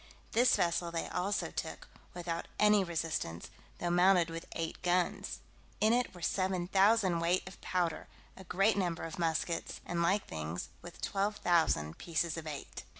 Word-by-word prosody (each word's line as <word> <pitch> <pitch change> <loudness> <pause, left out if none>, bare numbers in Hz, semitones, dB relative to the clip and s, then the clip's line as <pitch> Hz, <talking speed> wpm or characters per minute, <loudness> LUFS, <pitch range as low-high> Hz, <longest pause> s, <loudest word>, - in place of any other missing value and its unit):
This 245 +2 +5
vessel 170 0 +1
they 165 -1 -3
also 195 +3 -1
took, - - -5 0.3
without 170 -1 -3
any 210 -1 +5
resistance, 160 - -3 0.3
though 175 - -1
mounted 175 -1 +4
with 165 0 -6
eight 165 -1 -4
guns. 180 0 0 0.4
In 215 +2 +4
it 245 -5 0
were 175 - -10
7,000 190 +1 +2
weight 175 +2 +1
of 190 - -10
powder, 175 -3 -1 0.3
a 190 - -11
great 195 +5 +2
number 175 -4 -1
of 165 +1 -6
muskets, 165 0 -1
and 170 -1 -1
like 190 +4 +2
things, 80 +2 -5
with 175 - -11
12,000 175 - +1
pieces 170 -1 -1
of 165 -1 -6
eight. 145 -3 -6
175 Hz, 150 wpm, -33 LUFS, 165-190 Hz, 0.4 s, This